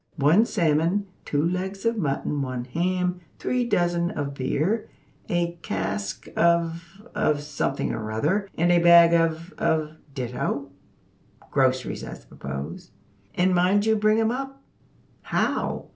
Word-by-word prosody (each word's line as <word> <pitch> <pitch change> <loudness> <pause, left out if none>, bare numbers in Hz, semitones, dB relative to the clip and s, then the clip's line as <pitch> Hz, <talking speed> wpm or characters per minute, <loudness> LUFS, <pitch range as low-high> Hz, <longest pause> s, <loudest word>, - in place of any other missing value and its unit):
One 165 +10 +4
salmon, 165 +5 +1 0.2
two 145 +1 0
legs 190 +3 -3
of 230 0 +2
mutton, 145 -5 -1
one 130 -2 -3
ham, 180 +6 -1 0.2
three 250 -1 0
dozen 175 -3 +1
of 140 -3 -4
beer, 155 - -1 0.4
a 175 -1 -1
cask 100 - -3
of 170 +3 +1
of 145 -1 +1
something 140 -2 -2
or 110 -1 -4
other, 185 - 0
and 175 +2 +3
a 175 - +5
bag 170 0 +7
of 165 +2 +1
of 155 -2 0 0.2
ditto, 130 +2 -3 0.8
(groceries, 130 -2 +1
I - - -6
suppose), 70 +4 -7 0.5
`and 185 +1 +3
mind 185 +4 +3
you 220 0 +3
bring 215 +1 +3
'em 225 0 +2
up!' 270 +2 -5 0.6
How! - - -1
170 Hz, 130 wpm, -25 LUFS, 140-185 Hz, 0.8 s, bag